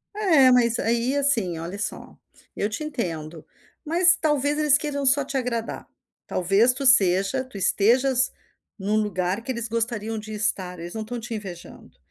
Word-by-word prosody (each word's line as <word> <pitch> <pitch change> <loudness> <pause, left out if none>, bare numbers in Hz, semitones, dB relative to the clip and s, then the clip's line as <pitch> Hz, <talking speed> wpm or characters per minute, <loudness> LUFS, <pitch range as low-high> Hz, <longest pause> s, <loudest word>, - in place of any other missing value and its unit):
É, 320 -11 +4
mas 235 -2 +3
aí, 235 +4 0
assim, 230 -12 +1
olha 170 +5 -6
só, - - -5 0.4
eu 205 - -2
te 225 +8 -5
entendo, 165 - -5 0.4
mas 350 +3 +4
talvez 295 -1 0
eles 295 -1 +5
queiram 285 -2 -4
só 280 +1 +4
te 275 - -8
agradar. 235 -3 -4 0.4
Talvez 195 +7 +2
tu 270 +2 -5
seja 195 +1 +4
tu 255 -6 -12
estejas 250 +7 +2 0.5
em 195 - -6
um 215 - +2
lugar 195 -1 -2
que 260 - -4
eles 235 -2 -4
gostariam 225 -1 -2
de 215 +1 -10
estar, 190 -4 -2
eles 170 +1 -8
não 220 - -5
estão 235 +2 -6
te 235 +1 -7
invejando, 180 - -10
230 Hz, 170 wpm, -23 LUFS, 195-270 Hz, 0.5 s, eles